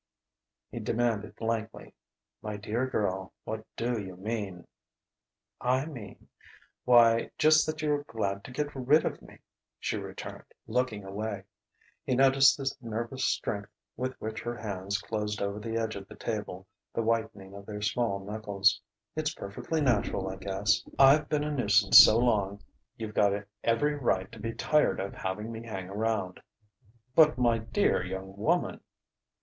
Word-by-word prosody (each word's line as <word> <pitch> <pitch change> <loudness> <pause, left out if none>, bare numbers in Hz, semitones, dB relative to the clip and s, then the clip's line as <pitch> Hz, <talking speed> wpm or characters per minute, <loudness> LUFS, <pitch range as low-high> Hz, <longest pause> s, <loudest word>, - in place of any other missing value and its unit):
He - - -5
demanded 115 -3 -1
blankly: 110 -1 -4 0.5
"My 105 -1 -5
dear 110 +5 -2
girl, 95 -6 -2
what 110 0 -5
do 120 -1 -1
you 95 -2 -8
mean?" 100 -3 -4 1.0
"I 130 +3 +1
mean.... 120 -12 -10 0.6
Why, 115 -2 +5
just 155 0 +5
that 155 0 -3
you're 150 -1 +1
glad 100 -5 -3
to - - -8
get 145 +2 -3
rid 135 +4 +3
of - - -3
me!" - - -15 0.4
she - - -2
returned, - - -8 0.2
looking 115 -3 -1
away. 100 +1 -4 0.6
He 130 - 0
noticed 135 +1 +6
the 135 -1 -2
nervous 115 +3 -3
strength 100 -2 -1 0.3
with 130 +1 -4
which 110 +1 -5
her 120 0 -4
hands 100 -2 -3
closed 105 -1 -3
over 100 +1 -2
the 115 +1 -3
edge 110 -1 -2
of 100 -1 -8
the - - -12
table, 105 -4 -4 0.3
the 115 - 0
whitening 110 -4 -2
of 100 0 -11
their 105 -1 -5
small 105 -2 0
knuckles.... 100 -1 +1 0.3
"It's 155 0 -1
perfectly 130 +11 -3
natural, 105 -7 +1
I 95 - -6
guess. 100 0 +1 0.2
I've 140 +2 +6
been 150 -1 +1
a 150 - -2
nuisance 105 -7 +6
so 110 - +9
long, 105 -4 +1 0.3
you've 110 -2 -6
got 100 -2 +3 0.3
every 145 +6 +2
right 105 -10 0
to 115 - -11
be 115 +2 -4
tired 150 +6 +2
of 100 +1 -4
having 105 +4 -4
me 115 0 -6
hang 95 -5 -6
around 100 -3 -2 0.4
" 120 +1 -35
"But, 155 -5 +6
my 120 -2 +3
dear 110 - +1
young 95 +1 -6
woman 160 - 0
110 Hz, 155 wpm, -29 LUFS, 100-125 Hz, 1.0 s, so